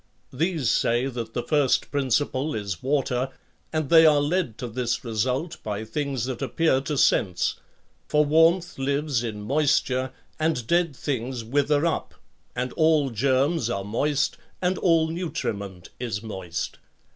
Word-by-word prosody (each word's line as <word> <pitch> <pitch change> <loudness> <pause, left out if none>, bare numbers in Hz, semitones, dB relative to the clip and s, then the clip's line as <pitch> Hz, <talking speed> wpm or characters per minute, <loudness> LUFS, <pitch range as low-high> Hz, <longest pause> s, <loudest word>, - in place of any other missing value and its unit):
These 160 -2 0
say 120 +2 +2
that 120 -4 -5
the 120 - -1
first 145 -4 +2
principle 140 +1 0
is 100 -4 -4
water, 130 -1 0 0.4
and 155 -2 -1
they 165 -1 +8
are 150 -2 +6
led 145 - 0
to 125 - -5
this 120 +1 -2
result 125 +9 -2
by 105 0 -4
things 135 +1 -2
that 130 -1 -4
appear 135 +1 +2
to 145 +1 -3
sense; 90 -8 +2 0.5
for 150 0 +3
warmth 165 +3 +3
lives 140 -2 0
in 105 -3 -5
moisture 130 -1 +1 0.3
and 155 -7 0
dead 170 0 +1
things 125 -3 -3
wither 145 +5 +1
up 165 - -2 0.4
and 125 +1 -2
all 155 -4 +3
germs 130 +4 +1
are 100 -4 -2
moist 135 +8 0 0.2
and 185 +1 0
all 165 -3 +3
nutriment 105 - -4
is 115 -4 -3
moist. 95 -6 -5
135 Hz, 145 wpm, -25 LUFS, 115-155 Hz, 0.5 s, they